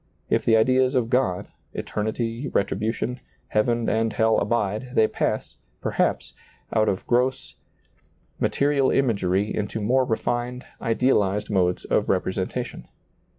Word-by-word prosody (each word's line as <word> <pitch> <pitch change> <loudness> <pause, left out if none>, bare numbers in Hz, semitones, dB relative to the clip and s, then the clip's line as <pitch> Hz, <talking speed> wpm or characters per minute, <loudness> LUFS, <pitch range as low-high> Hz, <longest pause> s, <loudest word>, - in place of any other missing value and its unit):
If - - +2
the 115 -1 +4
ideas 130 +3 +3
of 120 -2 +1
God, 125 -8 +1 0.3
eternity, 115 +4 -3
retribution, 115 +4 -1 0.3
heaven 115 +2 +1
and 110 +1 +1
hell 110 +1 +3
abide, 120 +2 -1
they 110 - +5
pass, - - -2 0.2
perhaps, - - -1 0.4
out 110 -1 +3
of 95 - -2
gross, 125 +2 0 0.9
material 140 -1 +2
imagery 100 -6 +1
into 105 +1 -2
more 125 +5 +2
refined, 120 +1 -2 0.2
ideal 120 +1 +3
ized 105 +2 -2
modes 90 -2 +1
of - - +1
representation. - - -2
115 Hz, 120 wpm, -24 LUFS, 105-125 Hz, 0.9 s, they